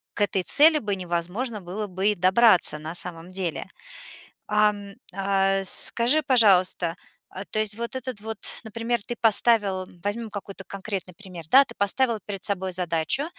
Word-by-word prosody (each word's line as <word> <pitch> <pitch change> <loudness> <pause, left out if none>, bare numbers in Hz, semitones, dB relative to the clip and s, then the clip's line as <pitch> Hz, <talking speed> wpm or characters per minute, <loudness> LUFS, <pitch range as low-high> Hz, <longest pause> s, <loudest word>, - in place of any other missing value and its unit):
к - - -5
этой 195 -2 0
цели 305 - +7
бы 205 -2 -3
невозможно 185 +6 -4
было 200 +4 -6
бы 190 +2 -2
и 210 - 0
добраться 185 -2 +4
на 160 +2 -7
самом 175 0 -2
деле. 185 -4 -4 0.8
Ам, 210 -1 0 0.2
а, 195 0 0
скажи, 240 +9 +4
пожалуйста, 185 - +3 0.3
а 190 - -7
то 215 - -1
есть 210 -1 -1
вот 235 +3 -5
этот 255 -4 -6
вот 220 0 -6 0.3
Например, 230 +2 -3
ты 240 - -4
поставил 210 -4 +2 0.2
Возьмем 220 +2 -4 0.4
конкретный 195 -2 -6
пример, 180 -2 -11
да. 275 +2 +7
Ты 235 - -12
поставил 225 +3 0
перед 195 -2 -7
собой 190 -2 -1
задачу, 175 - -2
200 Hz, 150 wpm, -24 LUFS, 185-230 Hz, 0.8 s, цели